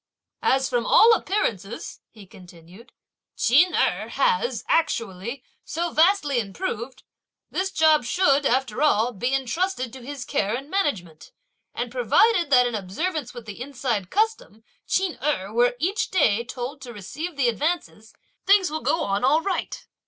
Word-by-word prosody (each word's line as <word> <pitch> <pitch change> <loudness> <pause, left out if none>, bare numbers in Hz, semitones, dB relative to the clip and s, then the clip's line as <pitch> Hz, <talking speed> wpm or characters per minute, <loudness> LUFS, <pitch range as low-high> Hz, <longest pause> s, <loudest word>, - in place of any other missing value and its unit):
"As 265 0 +2
from 245 -2 0
all 460 +1 +7
appearances," 230 - -2
he 215 -3 -15
continued, 180 +4 -16 0.5
"Ch'in 310 +10 +4
Erh - - +1
has, 485 -1 0
actually, 235 - -1 0.2
so 340 +2 -3
vastly 315 -6 +3
improved, 235 - -5 0.5
this 380 +1 -1
job 315 -6 +3
should, 285 +1 +2
after 260 -1 0
all, 245 -6 +3
be 245 +4 -2
entrusted 270 0 -2
to 260 - -10
his 280 0 -7
care 205 +3 -1
and 275 +4 -7
management; 195 - -2 0.4
and - - -3
provided 455 - +3
that 250 -3 +5
in 240 - -2
observance 260 - -3
with 240 -2 -9
the 210 +1 -9
inside 250 -8 -3
custom 430 - -1 0.2
Ch'in 380 -3 0
Erh 230 -9 -1
were 245 +1 +2
each 370 +9 -1
day 235 - +2
told 250 +4 -6
to 245 -2 -9
receive 295 - -6
the 275 -3 +1
advances, 240 -4 -2 0.4
things 390 -4 +4
will 315 0 -3
go 330 - 0
on 200 +2 -1
all 295 +5 +4
right." 400 +6 -3
265 Hz, 150 wpm, -24 LUFS, 225-340 Hz, 0.5 s, all